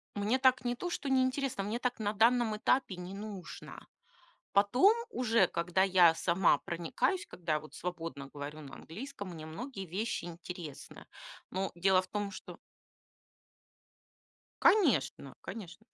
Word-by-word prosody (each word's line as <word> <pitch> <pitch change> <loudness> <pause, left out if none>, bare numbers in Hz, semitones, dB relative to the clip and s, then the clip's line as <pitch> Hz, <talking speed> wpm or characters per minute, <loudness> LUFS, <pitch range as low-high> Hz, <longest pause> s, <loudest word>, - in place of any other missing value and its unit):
Мне 210 +5 +1
так 260 -1 +4
не 245 0 0
то 355 +8 -4
что 285 -5 -3
не 260 -1 +4
интересно, 260 -4 -1
мне 210 +4 -2
так 245 -1 -2
на 210 -1 -1
данном 230 +1 +3
этапе 215 -2 +1
не 180 +1 -7
нужно. 200 -2 -8 0.7
Потом 245 - +5
уже, 230 -6 +3
когда 175 +3 +1
я 180 -4 +6
сама 175 +2 +3
проникаюсь, 175 - -1
когда 160 -3 -2
вот 155 - -14
я - - -9
свободно 165 -6 -5
говорю 145 +2 -7
на 140 -2 -10
английском, 205 - -8
мне 155 -2 -8
многие 195 - -6
вещи 195 +3 -3
интересны. 170 -3 -8 0.5
Но 190 +1 -2
дело 185 +1 +4
в 185 - -12
том, 205 -1 -3
что - - -10 2.0
Конечно 160 - +3
конечно. 205 0 -8
195 Hz, 145 wpm, -32 LUFS, 170-245 Hz, 2.0 s, я